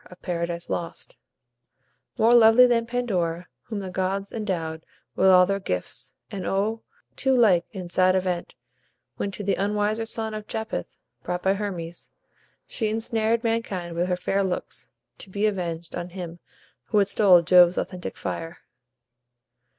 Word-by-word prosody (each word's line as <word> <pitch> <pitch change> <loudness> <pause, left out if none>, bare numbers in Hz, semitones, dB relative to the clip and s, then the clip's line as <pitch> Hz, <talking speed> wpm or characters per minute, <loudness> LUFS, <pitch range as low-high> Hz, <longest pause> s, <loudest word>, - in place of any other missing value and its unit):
of 180 - -15
"Paradise 170 -1 -3
Lost": 170 -1 -5 1.0
"More 230 +2 +5
lovely 235 +1 +8
than 230 -2 +2
Pandora, 180 -9 -1 0.2
whom 215 -3 -4
the 190 -1 -6
gods 190 +2 -2
Endowed 165 -7 -3 0.3
with 190 - +3
all 180 -1 +7
their 195 +1 -1
gifts; 90 - -4 0.2
and 195 -2 -5
O, 210 +5 -1 0.3
too 265 -1 +2
like 195 -8 +4
In 185 -4 -6
sad 185 +1 +3
event, 180 -2 -2 0.6
when 200 - -2
to 200 +1 -7
the 200 - +1
unwiser 210 +2 0
son 220 -1 -1
Of 215 -1 -6
Japhet 220 0 -4 0.3
brought 180 0 -4
by 190 - +3
Hermes, 180 -5 -5 0.6
she 220 -3 -2
insnared 225 +1 0
Mankind 200 -7 -2
with 175 +1 0
her 180 -1 0
fair 195 +2 0
looks, 185 -2 -4 0.3
to - - -9
be 200 +3 -1
avenged 170 -5 -2
On 175 0 -5
him 175 -2 -7 0.5
who 210 - 0
had 200 -1 +4
stole 190 -4 +5
Jove's 180 +1 +6
authentic 180 -1 -4
fire." 165 0 -5
190 Hz, 150 wpm, -25 LUFS, 175-220 Hz, 1.0 s, lovely